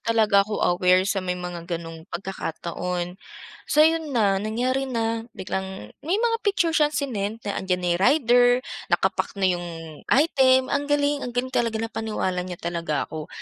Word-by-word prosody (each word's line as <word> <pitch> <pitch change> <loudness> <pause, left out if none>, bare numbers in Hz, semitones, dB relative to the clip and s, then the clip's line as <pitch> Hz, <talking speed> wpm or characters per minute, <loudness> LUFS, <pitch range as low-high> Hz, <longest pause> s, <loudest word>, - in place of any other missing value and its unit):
talaga 220 -3 +3
ako 210 +1 -1
aware 180 +1 +3
sa 195 -1 0
may 180 -1 -2
mga 175 -1 -6
ganong 165 +1 -10
pagkakataon. 180 0 -4 0.5
So 305 +1 +6
ayun 320 -4 +1
na, 195 -3 +3
nangyari 255 +5 -1
na 230 -1 -2
biglang 190 - -5
may 340 +6 0
mga 460 +1 +1
picture 390 -5 +1
siyang 300 -1 +2
sinend 225 -5 -3
na 200 - -2
'andiyan 185 -1 -1
na - - +1
'yung 175 - -1
rider, 245 0 +5 0.4
naka-pack - - 0
na 195 - 0
'yung 175 0 -4 0.4
item, 260 -3 +4
ang 285 0 0
galing 290 0 +2
ang 245 -1 -6
galing 255 +1 -1
talaga 230 -3 +1
napaniwala 220 -5 -2
niya 180 -1 -6
talaga 170 -3 -2
ako. 155 -1 -6
215 Hz, 165 wpm, -24 LUFS, 180-260 Hz, 0.5 s, So